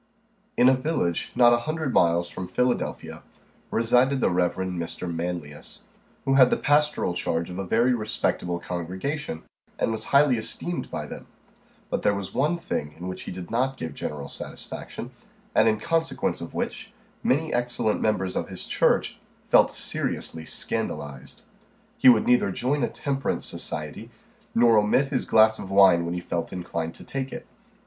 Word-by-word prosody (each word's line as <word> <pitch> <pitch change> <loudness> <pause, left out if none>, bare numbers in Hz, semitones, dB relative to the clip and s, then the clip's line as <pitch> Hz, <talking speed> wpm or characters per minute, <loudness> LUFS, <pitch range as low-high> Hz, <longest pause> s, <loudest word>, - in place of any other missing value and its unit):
IN 125 - +6
a 130 - +7
village 130 - -1
not 120 -1 +6
a 120 - +3
hundred 155 -4 -2
miles 85 0 +3
from 95 -1 -6
Philadelphia, 125 +6 -2 0.5
resided 125 +4 +3
the - - +2
Rev. 90 0 +1
Mr. 90 -1 -4
Manlius, 85 -3 -6 0.4
who 135 - +2
had 130 -2 +7
the - - +2
pastoral 150 -9 +2
charge 85 0 -2
of 90 - -6
a 95 - -4
very 120 +6 +3
respectable 105 -6 -1
congregation, 90 - -4 0.3
and - - 0
was 110 -1 -3
highly 140 -3 +4
esteemed 175 +9 -2
by - - -4
them; - - -9 0.6
but - - 0
there 100 - +2
was 100 -1 -5
one 150 +6 +1
thing 75 - -4
in 90 +2 -7
which 95 - -6
he - - -5
did 90 -1 -8
not 130 +3 0
give 80 -3 -5
general 70 -1 -5
satisfaction, - - -5 0.4
and - - +4
in 110 -1 0
consequence 165 +5 -1
of - - -8
which - - -4 0.3
many 155 +5 +1
excellent 120 -3 0
members 95 -4 0
of - - -2
his - - -6
church - - +1 0.3
felt - - +6
seriously 80 -1 -2
scandalized. 70 -3 -3 0.6
He 130 - +8
would 115 -3 +5
neither 125 -5 +3
join 135 +9 -1
a 120 - +1
temperance 135 -2 -2
society, - - -2 0.5
nor 115 -2 +6
omit 120 +7 +2
his 135 -3 -1
glass 110 0 +5
of 95 - -7
wine 95 -3 +5
when 85 +1 -3
he 90 - -3
felt 85 -1 -3
inclined 85 -2 -4
to - - -10
take 135 -1 -4
it. - - -7
110 Hz, 165 wpm, -25 LUFS, 90-130 Hz, 0.6 s, He